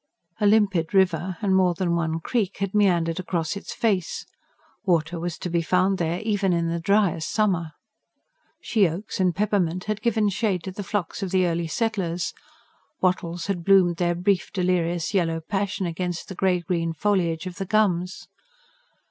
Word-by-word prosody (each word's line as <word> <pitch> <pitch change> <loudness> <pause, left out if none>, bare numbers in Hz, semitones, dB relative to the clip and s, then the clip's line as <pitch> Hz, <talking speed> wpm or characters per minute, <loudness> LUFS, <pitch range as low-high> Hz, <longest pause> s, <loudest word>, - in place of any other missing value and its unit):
A 210 - +3
limpid 200 -4 +2
river 185 -1 +2
and 190 -2 +3
more 180 -2 +3
than 175 -1 0
one 165 -1 -1
creek 210 -1 -1
had 195 -1 -2
meandered 175 -5 +2
across 170 -2 -2
its 200 - -7
face; 195 -7 -1 0.6
water 170 -3 +1
was 175 0 -4
to - - -5
be 170 -1 0
found 185 +3 +2
there 170 +1 -1
even 205 -4 +1
in 170 -1 0
the 170 0 -1
driest 190 -3 +1
summer. 180 -7 0 0.9
She 205 -6 +2
oaks 185 +7 -6
and 180 -3 +2
peppermint 185 -4 0
had 215 0 -3
given 220 -3 +2
shade 195 -3 -1
to 190 - -5
the 200 - -6
flocks 200 -3 -3
of 195 - -2
the 185 0 +2
early 170 -1 -1
settlers; 180 -3 -1 0.7
wattles 175 -2 0
had 195 -4 -2
bloomed 185 -2 +4
their 175 0 +1
brief 180 +1 0
delirious 175 -3 0
yellow 165 -4 +1
passion 195 +2 -2
against 175 0 -3
the - - -5
grey 180 -1 +1
green 165 -2 -1
foliage 170 -2 0
of 180 -1 -7
the 195 - -3
gums. 185 -4 +1
180 Hz, 170 wpm, -24 LUFS, 170-200 Hz, 0.9 s, bloomed